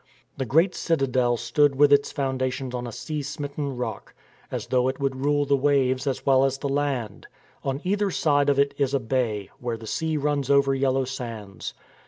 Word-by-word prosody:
The 130 -2 -3
great 165 - +3
citadel 130 -6 +1
stood 135 +5 +2
with 145 +1 +5
its 140 0 +3
foundations 130 -2 -2
on 125 -1 -3
a - - -6
sea 150 +6 -4
smitten 140 -1 -4
rock, 125 - -5 0.3
as - - -4
though 125 -1 +2
it 130 +1 -2
would 135 -1 0
rule 145 +2 +1
the 140 0 +3
waves 135 -1 +2
as 135 - -2
well 135 -1 +5
as 135 0 +1
the 140 +1 -3
land. 135 -7 -2 0.4
On 135 +1 -2
either 200 +2 +1
side 145 -5 +2
of 140 - +2
it 140 0 +3
is 140 -1 +1
a - - +2
bay, 110 -5 -1
where 120 -2 -3
the 110 - -11
sea 160 +7 -1
runs 145 -2 -1
over 140 -1 +4
yellow 135 0 +1
sands. 115 -6 -6
135 Hz, 195 wpm, -25 LUFS, 125-145 Hz, 0.4 s, with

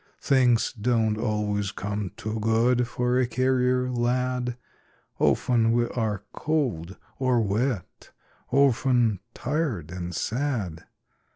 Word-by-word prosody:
Things 125 -4 +3
don't 115 -2 +1
always 105 -2 -1
come 100 0 -4
too 110 -1 -4
good 115 +3 +2
For 125 +1 0
a 130 - +2
carrier 125 0 +1
lad. 125 0 -1 0.6
Often 115 -2 +3
we 120 0 +2
are 110 -5 -2
cold 115 - -2 0.2
or 130 -2 +2
wet, 110 0 -2 0.4
Often 125 -5 +3 0.2
tired 135 - -2
and 90 -1 -5
sad. 110 - -2
120 Hz, 105 wpm, -26 LUFS, 105-125 Hz, 0.6 s, Things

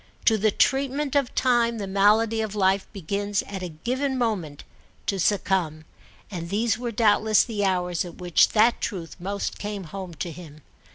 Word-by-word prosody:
To 225 - +5
the 215 +1 +2
treatment 275 +5 +1
of 275 -3 +1
time 240 -2 +2
the 205 - -4
malady 210 +3 +3
of 215 -1 -4
life 195 -1 +2
begins 200 +1 -2
at 195 -2 -7
a 180 - -4
given 255 - -2
moment 190 - -2 0.4
to 195 - -1
succumb; 175 -5 0 0.5
and 170 -3 -5
these 220 +4 +1
were 240 +1 -4
doubtless 215 -1 +3
the 215 -4 -3
hours 180 -3 0
at 175 -2 -9
which 175 -2 +3
that 225 +2 +4
truth 175 -5 -4
most 200 +3 -4
came 205 -1 -4
home 180 0 -8
to 170 +3 -4
him. 155 -4 -12
200 Hz, 170 wpm, -25 LUFS, 180-225 Hz, 0.5 s, To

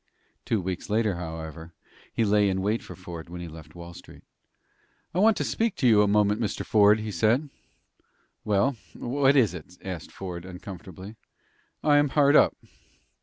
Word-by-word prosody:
Two 110 - +1
weeks 90 +2 -5
later, 105 -3 +1
however, 80 0 -7 0.4
he 115 - 0
lay 105 -1 +3
in 95 0 -1
wait 105 +3 0
for - - -10
Ford 85 -3 -9
when 90 0 -7
he 85 - -6
left 80 +1 -12
Wall 85 0 -9
Street. - - -14 0.9
"I 175 - 0
want 215 +1 +5
to - - 0
speak 225 -3 -1
to 130 - +1
you 110 -3 +6
a 105 - +3
moment, 105 +1 +2
Mr. 105 -2 -2
Ford," 105 0 +5
he 110 0 -4
said. 115 - +1 0.9
"Well, 110 +6 +1 0.2
what 135 +2 +2
is 115 - +4
it?" 90 +1 -10
asked 90 -4 -6
Ford, 90 -3 -7
uncomfortably. 95 +2 -10 0.7
"I 145 -1 +5
am 145 -1 +3
hard 145 +1 +4
up." - - +5
100 Hz, 170 wpm, -26 LUFS, 90-115 Hz, 0.9 s, you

